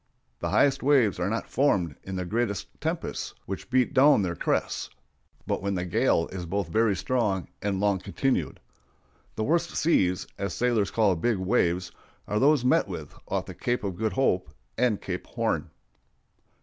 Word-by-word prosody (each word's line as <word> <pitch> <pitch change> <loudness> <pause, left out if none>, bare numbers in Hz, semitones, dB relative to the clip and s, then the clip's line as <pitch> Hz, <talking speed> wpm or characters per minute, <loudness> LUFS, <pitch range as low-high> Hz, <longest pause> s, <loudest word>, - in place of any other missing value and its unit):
The 85 - -2
highest 135 +9 +3
waves 130 -9 +3
are 90 +2 0
not 115 +2 -2
formed 95 - +1
in 95 - -6
the 90 -1 -2
greatest 110 +1 -1 0.2
tempests, - - -3
which 95 +5 -6
beat 125 -1 +2
down 135 -4 +6
their 85 -2 -2
crests, - - -1 0.6
but - - -1
when 100 0 -1
the 90 0 -2
gale 85 -1 +2
is 90 -2 -6
both 95 -1 -2
very 110 +2 +2
strong 105 -3 -1
and 100 -2 -1
long 100 -1 +2
continued. 135 +8 -1 0.8
The 110 - -1
worst 170 +6 0
"seas," 95 - +2
as 100 0 -2
sailors 115 -5 +1
call 100 -2 +2
big 110 +6 0
waves, 90 -3 +1 0.4
are 105 +2 0
those 140 -1 +4
met 130 - +3
with - - -7
off - - -1
the - - -8
Cape 120 -2 -2
of 95 -3 -3
Good 110 +3 -1
Hope 95 -10 +1 0.3
and 120 -3 +1
Cape - - -5
Horn. - - -1
105 Hz, 170 wpm, -27 LUFS, 95-125 Hz, 0.8 s, down